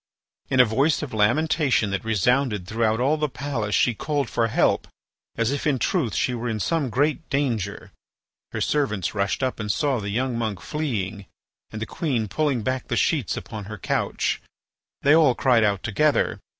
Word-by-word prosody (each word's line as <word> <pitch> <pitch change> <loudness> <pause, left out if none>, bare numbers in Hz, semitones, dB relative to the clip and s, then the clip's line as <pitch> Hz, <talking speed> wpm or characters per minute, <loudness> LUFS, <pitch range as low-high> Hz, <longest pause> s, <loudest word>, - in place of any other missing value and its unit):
In 130 - +1
a 125 - +9
voice 135 +9 +1
of 140 - -6
lamentation 125 +1 +2
that 100 - -2
resounded 110 -1 +1
throughout 110 +2 0
all 140 +5 +2
the 150 -1 -1
palace 125 -7 -2
she 125 - +3
called 145 +1 -2
for 115 - +1
help, 115 - +1 0.5
as 115 +2 0
if, 145 +2 -2
in 140 -3 +2
truth, 115 -2 0
she 125 - +1
were 120 0 -3
in 110 -1 -2
some 155 +1 0
great 145 +6 0
danger. 120 -9 -2 0.6
Her - - -4
servants 120 - 0
rushed 100 +4 -1
up 130 -2 -1
and 105 -1 -1
saw 140 +1 0
the 100 -1 -4
young 125 +4 -1
monk 110 -5 -2
fleeing 105 - -3 0.4
and 110 - -7
the 110 - -3
queen 125 -6 -2
pulling 130 +2 0
back 130 +2 -2
the - - -1
sheets - - +1
upon 105 -2 -7
her 110 +2 -7
couch. - - -1 0.6
They 145 - +6
all 155 -6 +5
cried 120 -4 +3
out 100 -3 +1
together. 140 +4 +1
120 Hz, 180 wpm, -24 LUFS, 105-140 Hz, 0.6 s, a